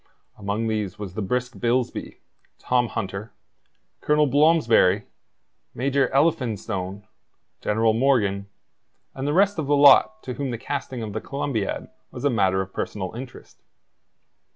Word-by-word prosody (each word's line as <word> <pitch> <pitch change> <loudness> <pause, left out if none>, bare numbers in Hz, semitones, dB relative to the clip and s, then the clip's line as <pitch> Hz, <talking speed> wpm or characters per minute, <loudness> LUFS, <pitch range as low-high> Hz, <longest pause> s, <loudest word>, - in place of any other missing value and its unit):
Among 105 +2 -3
these 105 -4 -2
was 100 -4 -7
the 110 - -4
brisk 125 +5 -2
Bilsby, 120 +1 -1 0.4
Tom 125 -1 +1
Hunter, 100 +1 -5 0.7
Colonel 150 0 +3
Blomsberry, 135 - +4 0.7
Major 135 +1 +1
Elphinstone, 110 - -1 0.6
General 110 +1 +2
Morgan, 110 -6 +1 0.7
and 135 +1 -4
the 145 - +1
rest 195 +1 +3
of 150 - -2
the 145 0 +3
lot 145 +10 +6
to 125 - -5
whom 135 +2 -3
the 120 - -3
casting 130 -1 -4
of 105 -2 -6
the 110 - -3
Columbiad 135 -7 -3 0.2
was - - -7
a 145 - +3
matter 95 -4 +2
of 95 0 -7
personal 95 -3 -4
interest. 120 +2 -10
120 Hz, 135 wpm, -24 LUFS, 105-140 Hz, 0.7 s, lot